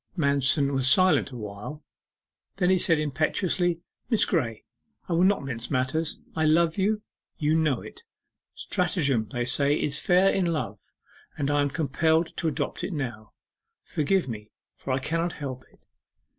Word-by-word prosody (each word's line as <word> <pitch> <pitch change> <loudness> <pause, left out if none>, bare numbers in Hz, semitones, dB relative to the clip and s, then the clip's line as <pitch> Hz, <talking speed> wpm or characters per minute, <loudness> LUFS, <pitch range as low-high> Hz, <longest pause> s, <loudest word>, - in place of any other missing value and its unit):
Manston 140 -1 +3
was 130 -1 +3
silent 185 +1 +5
awhile. 115 +5 -8 0.7
Then 185 -2 +2
he 185 - +3
said 165 -2 +3
impetuously: 165 +4 0 0.3
'Miss 225 -4 +3
Graye, 115 - -1 0.4
I 175 - -2
will 170 +2 +3
not 195 -4 +2
mince 120 -4 -5
matters 140 +5 -1 0.2
I 160 - 0
love 160 +1 +3
you 210 +2 +1 0.3
you 150 0 +1
know 155 -5 +1
it. - - -12 0.5
Stratagem 140 - 0
they 120 0 -2
say 140 +4 +2
is 145 0 +2
fair 185 +2 +4
in 185 -2 +1
love, 165 -3 -3 0.6
and 145 -1 -1
I 145 0 +2
am 145 - +1
compelled 160 +3 0
to 165 - -1
adopt 155 - -3
it - - -3
now. 120 -8 -5 0.5
Forgive 175 +1 0
me, 105 -3 -7 0.3
for 135 - -6
I 130 - +2
cannot 165 +5 -1
help 130 -3 -7
it. - - -28
150 Hz, 155 wpm, -26 LUFS, 130-170 Hz, 0.7 s, silent